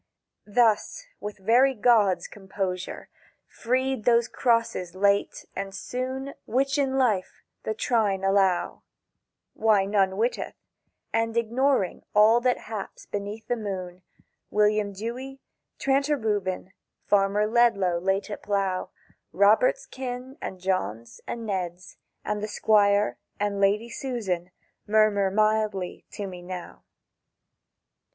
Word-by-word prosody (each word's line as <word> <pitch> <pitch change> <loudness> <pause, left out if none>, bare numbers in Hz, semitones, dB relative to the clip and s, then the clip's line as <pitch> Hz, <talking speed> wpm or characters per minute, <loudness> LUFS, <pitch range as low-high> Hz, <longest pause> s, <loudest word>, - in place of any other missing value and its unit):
—Thus, 230 - +2
with 210 0 -6
very 245 +7 +4
gods' 205 -6 +3
composure, 190 -2 -5 0.4
freed 260 0 -1
those 235 0 +4
crosses 230 -7 0
late 200 +1 +1
and 195 0 -5
soon 260 +5 -4
Which, 275 +4 +1
in 270 -1 +1
life, 215 -8 0 0.2
the 220 - -3
Trine 210 -5 +1
allow 195 -2 +2 0.7
(Why, 215 -3 +3
none 195 -1 +1
witteth), 235 +4 -1 0.6
and 225 0 0
ignoring 235 -2 +1
all 220 +3 +6
that 250 0 +1
haps 215 -3 -7
beneath 205 +2 -5
the 245 - +1
moon, 185 -5 -5 0.5
William 210 -1 +2
Dewy, 245 +7 -6 0.4
Tranter 275 +2 +1
Reuben, 195 -5 -2 0.3
Farmer 205 +1 +3
Ledlow 210 -6 +3
late 195 +2 0
at - - -5
plough, 195 -2 -1 0.4
Robert's 215 - +4
kin, 255 0 -6
and 185 - -6
John's, 115 - -3
and 230 -1 -5
Ned's, 180 -3 -4 0.3
And 210 -1 -2
the 210 - -2
Squire, 205 -1 +3 0.2
and 205 -1 -1
Lady 210 +4 +2
Susan, 205 -10 -3 0.4
murmur 210 -2 +3
mildly 215 -2 0
to 205 - -4
me 180 -2 -8
now. 180 0 -8
210 Hz, 115 wpm, -26 LUFS, 195-235 Hz, 0.7 s, all